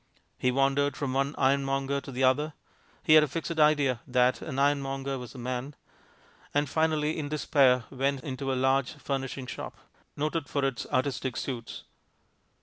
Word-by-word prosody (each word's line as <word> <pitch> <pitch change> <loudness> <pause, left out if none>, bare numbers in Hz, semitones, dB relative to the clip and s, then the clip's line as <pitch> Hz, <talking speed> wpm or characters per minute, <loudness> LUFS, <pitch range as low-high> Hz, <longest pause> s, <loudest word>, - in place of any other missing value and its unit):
He 125 - +2
wandered 140 +2 +1
from 135 -3 -2
one 140 +2 0
ironmonger 135 0 +1
to 135 - -9
the 130 +1 -2
other 145 +4 +2 0.5
(he 155 - +5
had 155 -1 +8
a - - +1
fixed 165 +3 -4
idea 145 -5 +3
that 125 0 +2
an 135 -4 -5
ironmonger 135 -1 0
was 125 -1 -9
the - - -11
man), 125 +3 -4 0.8
and 145 0 +2
finally, 155 +1 +1
in 145 -2 -3
despair, 135 -4 +3
went 135 0 -1
into 135 -1 -3
a - - 0
large 130 0 +2
furnishing 135 -1 -4
shop, - - -7 0.4
noted 155 +1 -2
for 140 -2 0
its 135 -4 -2
"artistic 130 -1 -1
suites." 120 -4 -5
135 Hz, 160 wpm, -28 LUFS, 130-145 Hz, 0.8 s, had